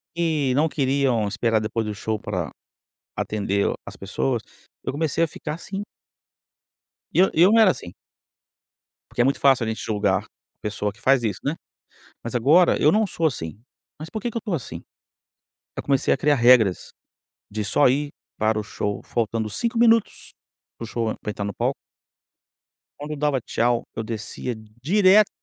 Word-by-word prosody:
que 155 -6 +1
não 155 +3 +3
queriam 135 -6 +1
esperar 115 +2 +1
depois 110 +1 -2
do 105 - -3
show 110 +2 -2
para 90 -8 -3 0.7
atender 100 -1 0
as - - -9
pessoas. 65 +1 -2 0.4
Eu - - -2
comecei 160 +2 0
a - - +2
ficar 150 0 -6
assim. 195 +3 -6 1.3
E - - -2
eu 190 +1 +6
e 165 - +4
eu 190 - +6
não 225 - +6
era 215 - +7
assim. 85 - -5 1.2
Porque - - -5
é - - +6
muito 135 +2 +1
fácil 135 -4 +4
a - - -3
gente 110 - -3
julgar 105 -3 0 0.4
pessoa 105 -1 -2
que 105 - -22
faz 135 -1 +3
isso, 105 -5 -2
né. 145 +4 -1 0.7
Mas 115 - -5
agora 150 +9 +4
eu 150 - +5
não 215 0 +3
sou 165 -3 -1
assim. 100 - -3 0.4
Mas 155 +2 -7
por 220 - -4
que 240 - -2
que 235 - -11
eu - - 0
estou 205 -5 -3
assim? 140 - -5 1.0
Aí - - -3
comecei 140 -2 +2
a - - -1
criar 145 +2 +3
regras, 120 -6 +4 0.6
de 105 0 -3
só 130 +8 +4
ir 145 +3 +1 0.3
para 110 0 +1
o - - -1
show 105 -1 -4
faltando 115 -1 -1
5 230 - -1
minutos, 230 -2 +3 0.5
para - - -6
o - - -7
show 115 -1 -1 0.2
entrar 105 -1 -3
no 100 -1 -4
palco. - - -1 1.2
Quando 150 +1 -6
eu - - -3
dava 145 -2 +1
tchau, 120 +1 0
eu 110 - -3
descia 115 +2 -5 0.3
direto 200 +6 +5
125 Hz, 175 wpm, -23 LUFS, 110-160 Hz, 1.3 s, era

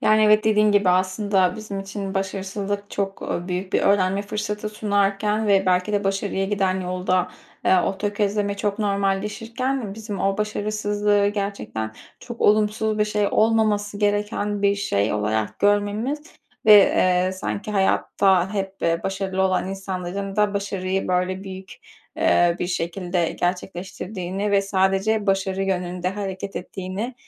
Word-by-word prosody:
Yani, 215 0 +4
evet 215 +1 +5
dediğin 210 -1 +4
gibi, 205 -2 +3
aslında 185 +1 +2
bizim 205 -2 -5
için 195 0 -5
başarısızlık, 195 +1 -3
çok, 195 -1 -3
ııı, 175 +1 -3
büyük 185 +1 -3
bir - - +3
öğrenme 195 0 +2
fırsatı 210 0 -3
sunarken 210 0 0
ve 195 -2 +3
belki 180 +3 +2
de 205 0 0
başarıya 195 0 -1
giden 190 -2 0
yolda, 180 0 0 0.4
ııı, 185 -1 +5
o 190 - -2
tökezleme 205 0 -1
çok 205 0 -2
normalleşirken 210 +4 -1
bizim 215 -2 -6
o 195 +1 0
başarısızlığı 210 -1 0
gerçekten 200 - -4 0.3
çok 240 -1 -9
olumsuz 215 +1 +2
bir 210 - +4
şey, 210 -1 0
olmaması 215 -2 +2
gereken 205 0 0
bir 200 0 +4
şey 105 - 0
olarak 105 0 -1
görmemiz 205 +7 +1 0.5
ve, 210 -2 +8 0.3
ııı, 185 - -1
sanki 200 +3 -4
hayatta 190 -1 +2
hep 195 -1 -3 0.2
başarılı 190 0 -1
olan 185 0 +1
insanların 195 +1 -4
da 210 -1 +2
başarıyı, 195 -1 -2
böyle, 185 +1 0
büyük, 190 -1 -8 0.5
ııı, 175 0 +3
bir - - -1
şekilde 175 0 -1
gerçekleştirdiğini 185 +2 -3
ve 200 -1 +3
sadece 195 +2 +1
başarı 195 0 0
yönünde 180 -1 -1
hareket 195 0 -5
ettiğini, 190 +6 -5
200 Hz, 135 wpm, -23 LUFS, 190-210 Hz, 0.5 s, ve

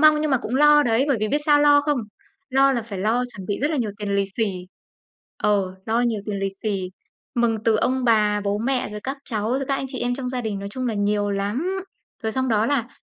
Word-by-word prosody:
mong 305 -1 +6
nhưng 305 -1 0
mà 260 - +3
cũng 240 - -3
lo 295 +1 +6
đấy, 235 +2 +2
bởi 275 - +3
vì 215 - 0
biết 290 +2 +1
sao 290 -1 +5
lo 290 0 +6
không? 290 -2 0 0.5
Lo 270 +1 +4
là 240 -3 -1
phải 205 -4 -7
lo 225 +5 +1
chuẩn 190 -3 -8
bị 205 - -2
rất 295 - +2
là 310 - 0
nhiều 225 -5 -1
tiền 200 -1 -2
lì 200 0 +2
xì 225 - +2 0.9
ờ, 195 -3 +1
lo 225 +1 +1
nhiều 230 -4 0
tiền 205 -2 -2
lì 195 0 0
xì, 195 -4 -2 0.4
mừng 235 -2 +2
từ 225 -2 +4
ông 255 +3 0
bà, 210 -3 +3
bố 200 0 0
mẹ, 250 +2 0
rồi 210 0 -6
các 270 +2 -3
cháu, 215 -2 -2
rồi 275 +1 0
các 275 - +2
anh 270 - -3
chị 260 -2 -6
em 245 0 0
trong 250 -1 -4
gia 250 -1 -2
đình, 215 -3 -3
nói 200 0 -5
chung 255 +4 -4
là 230 - -1
nhiều 205 0 0
lắm. 265 - -2 0.4
Rồi 220 -1 -1
xong 260 0 0
đó 220 0 +2
là, 255 -4 0
235 Hz, 260 wpm, -23 LUFS, 210-270 Hz, 0.9 s, mong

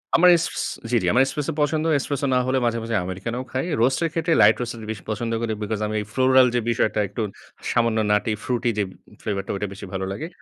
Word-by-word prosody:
আমার 180 +1 +7
এস 165 - -1 0.5
জি, - - +2
জি। - - -1
আমার 130 +2 +5
Espresso 150 +3 -3
পছন্দ। 155 +2 +1
Espresso 140 0 -2
না - - +4
হলে 130 0 +2
মাঝে, 115 0 +1
মাঝে 115 -1 -2
Americano 95 +7 -4
খাই। 130 +5 -1 0.2
Roast 130 +2 +3
এর 165 - +1
ক্ষেত্রে 165 0 +1
Light 105 +2 +6
Roast 120 -1 -3
টা - - -10
বেশি 100 -5 -7
পছন্দ 115 +2 -2
করি 115 -1 -1
বিকজ 105 0 -2
আমি 110 0 -2 0.2
floral 130 0 +5
যে - - +3
বিষয়টা 110 -2 +1
একটু 105 +4 -5 0.5
সামান্য 115 -1 +2
nutty 105 +1 +2
fruity 120 -1 0
যে 105 - +2 0.4
ফ্লেভারটা 100 -2 -3
ঐটা 105 +1 -2
বেশি 95 - -9
ভালো 95 0 -2
লাগে। 155 +12 -4
120 Hz, 220 wpm, -23 LUFS, 105-130 Hz, 0.5 s, আমার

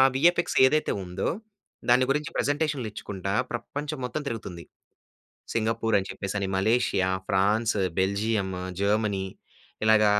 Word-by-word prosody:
VFX 170 +6 +3
ఏదైతే 155 +4 +2
ఉందో 90 +2 -2 0.6
దాని 125 +1 +6
గురించి 150 +3 0
ప్రజెంటేషన్‌లిచ్చుకుంట, 130 - -2 0.2
ప్రపంచం 145 +5 -4
మొత్తం 150 +5 -3
తిరుగుతుంది. 95 -7 -6 0.9
సింగపూర్ 115 0 0
అని 95 - -4
చెప్పేససి, 100 0 -3
మలేషియా, 100 -2 +2 0.2
ఫ్రాన్స్, 105 +4 +2 0.2
బెల్జియం, 100 +1 0 0.3
జర్మనీ 100 -1 +1 0.6
ఇలాగ 110 0 +5
110 Hz, 100 wpm, -27 LUFS, 100-130 Hz, 0.9 s, దాని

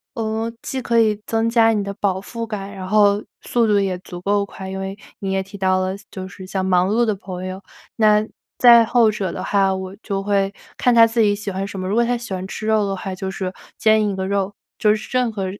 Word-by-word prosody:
呃， 225 0 -2
既 265 - -4
可 235 -1 +2
以 215 -2 +2
增 225 0 +1
加 230 -1 +4
你 210 -2 0
的 200 0 -4
饱 195 -2 -1
腹 230 +4 -6
感， 205 -2 -6
然 185 -1 -6
后 205 0 +4 0.2
速 235 -1 +1
度 205 -1 +3
也 190 -2 0
足 175 -1 -9
够 200 +2 +1
快。 190 -1 -9
因 190 0 -5
为 195 +1 -5 0.2
你 195 -1 -3
也 190 0 +1
提 195 +1 -11
到 185 -1 +2
了 185 0 -1 0.2
就 185 -1 -6
是 190 0 -10
像 190 -1 -2
忙 185 0 +3
碌 235 +2 +3
的 215 -2 0
朋 185 -2 -7
友， 185 +1 -6 0.3
那 215 -1 +4 0.3
在 235 -2 +8
后 230 0 +4
者 195 -4 -3
的 185 - -5
话， 195 -1 +2
我 190 0 -5
就 195 -3 -2
会 195 -1 0 0.2
看 245 - +3
他 230 -1 +7
自 230 +1 +1
己 205 -2 +4
喜 205 0 -5
欢 190 +1 -3
什 195 -1 -6
么， 185 - -3
如 200 - 0
果 235 - +4
他 245 +1 0
喜 235 -4 -7
欢 185 0 -4
吃 215 - -6
肉 215 -2 +3
的 195 - -2
话， 190 -1 -5
就 190 +1 -4
是 190 -1 -4 0.2
煎 215 -1 +3
一 195 - -2
个 190 0 -3
肉， 200 0 -1 0.2
就 210 -1 +4
是 215 0 -5
任 250 -2 +1
何 200 -3 -3
200 Hz, 270 characters per minute, -21 LUFS, 190-220 Hz, 0.3 s, 在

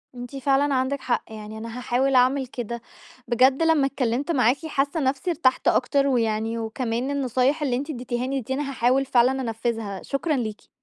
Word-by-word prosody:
أنتِ 245 +2 -8
فعلًا 275 +1 +2
عندِك 260 +2 0
حق، 250 - 0
يعني 215 0 -8
أنا 230 +2 -7
هاحاول 250 +2 +1
أعمل 255 +1 +3
كده. 235 -1 -5 0.5
بجد 260 +5 +4
لما 320 -4 +4
اتكلّمت 270 +3 -1
معاكِ 260 +2 +2
حاسّة 290 +1 -1
نَفسي 275 +5 -1
ارتحت 260 -6 +1
أكتر 275 +2 +2
ويعني، 225 -2 0
وكمان 230 +3 -2
النصايح 270 +2 +1
اللي 265 -4 +1
أنتِ 280 +5 -4
ادّيتيها 250 -2 -3
لي 270 0 -1
دي 260 +4 -4
أنا 280 0 -2
هاحاول 260 +1 +2
فعلًا 260 +1 +3
أنفّذها. 225 -4 -3
شكرًا 290 +2 -1
ليكِ. 220 -4 -4
255 Hz, 170 wpm, -24 LUFS, 235-275 Hz, 0.5 s, بجد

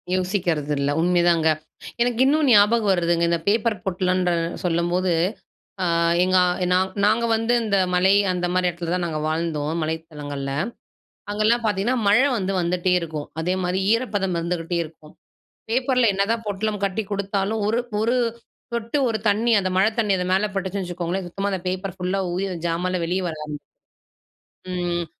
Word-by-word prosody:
யோசிக்கறதுல்ல 160 -7 0
உண்மைதாங்க. 175 -2 +3 0.5
எனக்கு 240 0 +1
இன்னும் 300 +2 +3
ஞாபகம் 210 0 +5
வருதுங்க, 170 -1 +1
இந்த 170 0 +1
பேப்பர் 215 -1 +1
பொட்டலன்ற 185 -1 0 0.3
சொல்லும்போது. 175 +1 +1 0.7
ஆ - - +1 0.4
எங்க 185 0 +3 0.4
நாங் 185 +1 +2 0.2
நாங்க 225 +3 +3
வந்து 225 +2 0
இந்த 205 -3 +1 0.2
மலை 190 +2 +4 0.2
அந்த 180 -1 -1
மாரி 185 0 +2
இடத்துல 170 0 -4
தான் 180 -1 0
நாங்க 155 -2 -3
வாழ்ந்தோம் 155 -2 -1
மலைத்தளங்கள்ல. 150 -4 -5 0.8
அங்கலாம் 215 +3 +2
பார்த்தீங்கன்னா, 210 +4 +1
மழ 205 +3 +6 0.2
வந்து 195 0 -2
வந்துட்டே 180 +1 0
இருக்கும், 155 -3 -5
அதேமாரி 180 +2 -1
ஈரப்பதம் 205 -7 0
இருந்துட்டே 170 0 -2
இருக்கும். 155 -1 -15 0.6
பேப்பர்ல 250 0 +2
என்னதான் 225 +4 0
பொட்டலம் 205 0 -2
கட்டிக் 200 +1 -2
குடுத்தாலும் 200 +2 -1
ஒரு 225 +2 +1 0.2
ஒரு 235 +3 +2 0.6
சொட்டு 235 +4 -1
ஒரு 225 -1 -1
தண்ணி 220 +4 +2
அந்த 185 -2 -1
மழ 190 +3 +4
தண்ணி 210 -3 +2
அது 180 - -1
மேல 195 +3 +3
பட்டுச்சுன்னு 195 0 -2
வச்சுக்கோங்களேன், 175 +1 -3
சுத்தமா 195 +3 -3
அந்த 190 - -2
பேப்பர் 185 0 -3
ஃபுல்லா 185 +2 -1
ஊறி 185 +3 -1
அந்த 175 -3 -5
ஜாமான்ல 180 +2 -1
வெளிய 180 +3 -1
வர 160 -2 -4
ஆரம்பிச்சு. 150 -1 -6 1.1
ம். 175 -1 -1
185 Hz, 150 wpm, -23 LUFS, 170-210 Hz, 1.1 s, மழ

